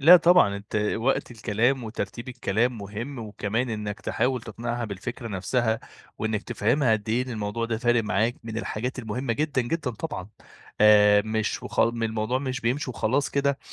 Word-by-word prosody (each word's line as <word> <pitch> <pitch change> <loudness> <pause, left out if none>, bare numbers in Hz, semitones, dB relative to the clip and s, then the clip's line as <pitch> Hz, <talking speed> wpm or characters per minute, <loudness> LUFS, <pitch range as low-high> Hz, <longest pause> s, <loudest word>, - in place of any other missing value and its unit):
لأ، 165 +6 +10
طبعًا 175 - +5
أنتَ 100 +1 -6 0.2
وقت 125 +4 0
الكلام 120 +3 0
وترتيب 115 +2 -5
الكلام 120 -1 0
مهم، 110 +7 -6
وكمان 110 +2 -2
أنكَ 105 -1 -4
تحاول 125 -2 0
تقنعها 120 +2 -4
بالفكرة 115 +4 -5
نفسها، 110 +3 0 0.4
وأنكَ 110 -1 -1
تفهمها 120 +5 +1
قد 110 -1 -1
إيه 120 +3 +1
إن - - -6
الموضوع 110 0 -2
ده 115 -1 -2
فارق 120 0 +3
معاكَ 110 +4 +1
من 115 0 -4
الحاجات 120 +3 -3
المهمّة 120 +2 -2
جدًا، 145 +2 0
جدًا 145 +1 -2
طبعًا، 110 - -5 0.5
آآ، 105 -1 +7
مش 110 0 -1
وخ - - -2
الموضوع 115 +1 +1
مش 130 -1 -3
بيمشي 130 +3 -1
وخلاص 130 +4 0
كده 140 0 +1
115 Hz, 160 wpm, -26 LUFS, 110-125 Hz, 0.5 s, لأ